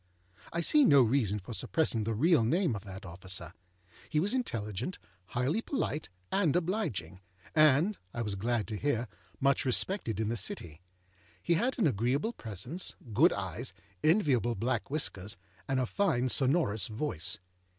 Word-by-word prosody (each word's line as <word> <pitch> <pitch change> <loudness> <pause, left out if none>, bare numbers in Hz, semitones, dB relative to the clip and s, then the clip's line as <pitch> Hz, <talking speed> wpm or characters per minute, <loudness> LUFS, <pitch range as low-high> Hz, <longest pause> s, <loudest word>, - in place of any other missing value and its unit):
I 170 - -1
see 295 - +5
no 140 - +7
reason 110 -4 +1
for 105 +4 -8
suppressing 115 -4 +1
the 115 0 -1
real 155 +2 +4
name 165 - +1
of 105 0 -7
that 95 0 -8
officer. 90 -1 -5 0.6
He 155 - +1
was 195 +8 +2
intelligent, 115 - -3 0.3
highly 125 - 0
polite, 155 - -2 0.2
and 185 -7 +2
obliging, 165 - -1 0.3
and 155 +6 +4
(I 120 - -3
was 105 -2 -2
glad 110 +2 -1
to 105 - -3
hear) 125 -2 0 0.3
much 140 0 +2
respected 130 - +1
in 110 -1 0
the 115 - -1
City. 85 -5 -2 0.6
He 170 - +2
had 240 +10 +1
an 220 - +2
agreeable 135 - +1
presence, 115 - -6 0.2
good 160 - +6
eyes, 95 -4 -4 0.3
enviable 140 - +3
black 115 +2 -1
whiskers, 105 -9 -1 0.3
and 135 -1 +1
a 130 - +1
fine 130 - +1
sonorous 130 - +2
voice. 110 - -1
125 Hz, 150 wpm, -31 LUFS, 105-160 Hz, 0.6 s, no